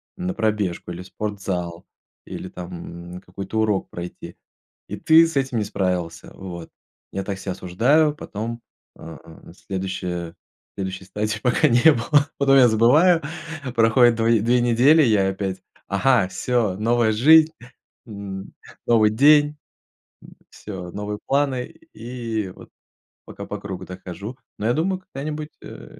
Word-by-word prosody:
на 180 Hz, -1 st, -4 dB
пробежку 105 Hz, -6 st, -1 dB
или 85 Hz, +1 st, -7 dB
в 90 Hz, -, -11 dB
спортзал, 95 Hz, -4 st, -4 dB, 0.4 s
или 95 Hz, -, -7 dB
там 85 Hz, 0 st, -9 dB
какой-то 95 Hz, +4 st, -5 dB
урок 105 Hz, -3 st, 0 dB
пройти. 85 Hz, 0 st, -8 dB, 0.5 s
И -, -, -6 dB
ты 160 Hz, +1 st, +6 dB
с 165 Hz, -, -7 dB
этим 135 Hz, -3 st, 0 dB
не 110 Hz, -, +1 dB
справился, 90 Hz, -5 st, -3 dB
вот. 85 Hz, -3 st, -8 dB, 0.4 s
Я 95 Hz, -, -3 dB
так 95 Hz, -1 st, -5 dB
себя 95 Hz, -1 st, -4 dB
осуждаю, 140 Hz, -, +2 dB
потом, 115 Hz, -3 st, -6 dB, 0.3 s
а, 80 Hz, -1 st, -10 dB, 0.3 s
на -, -, -14 dB
следующей 90 Hz, -3 st, -5 dB, 0.4 s
следующей 95 Hz, 0 st, -5 dB
стадии 105 Hz, +3 st, -3 dB
пока 130 Hz, +5 st, +3 dB
не 120 Hz, +5 st, +6 dB
было. 145 Hz, +3 st, +2 dB
Потом 135 Hz, -1 st, +4 dB
я 130 Hz, -2 st, +7 dB
забываю, 150 Hz, +10 st, +4 dB, 0.5 s
проходит 115 Hz, +1 st, +5 dB
два 115 Hz, 0 st, 0 dB
две 115 Hz, +2 st, +3 dB
недели, 125 Hz, +7 st, +5 dB
я 105 Hz, -8 st, +3 dB
опять: 95 Hz, -1 st, -4 dB, 0.3 s
"Ага, 110 Hz, +1 st, +2 dB
всё, 105 Hz, +1 st, -1 dB
новая 115 Hz, +2 st, +2 dB
жизнь", 155 Hz, +8 st, +6 dB, 0.5 s
м, 100 Hz, -3 st, -7 dB, 0.4 s
новый 110 Hz, -2 st, +4 dB
день, 145 Hz, +5 st, +5 dB, 0.7 s
м, -, -, -18 dB
всё, 95 Hz, -4 st, -8 dB
новые 105 Hz, +1 st, -5 dB
планы. 135 Hz, -2 st, +1 dB, 0.3 s
И 115 Hz, -4 st, -4 dB
вот -, -, -14 dB, 0.6 s
пока 100 Hz, -, -9 dB
по 105 Hz, -, -6 dB
кругу 95 Hz, -2 st, -7 dB
так 90 Hz, 0 st, -10 dB
хожу. 100 Hz, +7 st, -7 dB, 0.2 s
Но 105 Hz, -, -4 dB
я -, -, +3 dB
думаю, 185 Hz, +6 st, -1 dB
когда-нибудь, 150 Hz, -3 st, -6 dB
э, -, -, -12 dB
110 Hz, 145 wpm, -22 LUFS, 95-130 Hz, 0.7 s, я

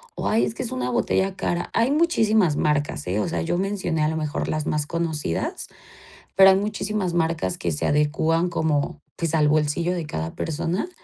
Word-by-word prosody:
o -, -, -3 dB
ay, 220 Hz, +1 st, +3 dB
es 220 Hz, -, -4 dB
que -, -, -3 dB
es 240 Hz, -, -4 dB
una 255 Hz, 0 st, -2 dB
botella 195 Hz, -5 st, 0 dB
cara. 175 Hz, -2 st, -2 dB
Hay 230 Hz, +4 st, +2 dB
muchísimas 220 Hz, -, +3 dB
marcas, 145 Hz, -, 0 dB
¿eh? 95 Hz, +4 st, -1 dB
O 105 Hz, -, 0 dB
sea, 85 Hz, -2 st, -2 dB
yo 175 Hz, -, -1 dB
mencioné 185 Hz, -5 st, -1 dB
a 150 Hz, -, +3 dB
lo 160 Hz, +1 st, -1 dB
mejor 150 Hz, -2 st, -2 dB
las 155 Hz, -1 st, -2 dB
más 150 Hz, -1 st, -1 dB
conocidas, 160 Hz, -, -2 dB, 0.7 s
pero 195 Hz, 0 st, +8 dB
hay 190 Hz, -, +5 dB
muchísimas 205 Hz, -2 st, -2 dB
marcas 160 Hz, -, 0 dB
que 85 Hz, -, -2 dB
se 75 Hz, -, -2 dB
adecuan 160 Hz, +3 st, +1 dB
como, 155 Hz, -4 st, -1 dB
pues, 165 Hz, -2 st, -2 dB
al 150 Hz, -1 st, +3 dB
bolsillo 155 Hz, +4 st, +1 dB
de 170 Hz, -3 st, -3 dB
cada 80 Hz, -, -5 dB
persona. 165 Hz, -, -2 dB
165 Hz, 195 wpm, -23 LUFS, 150-195 Hz, 0.7 s, pero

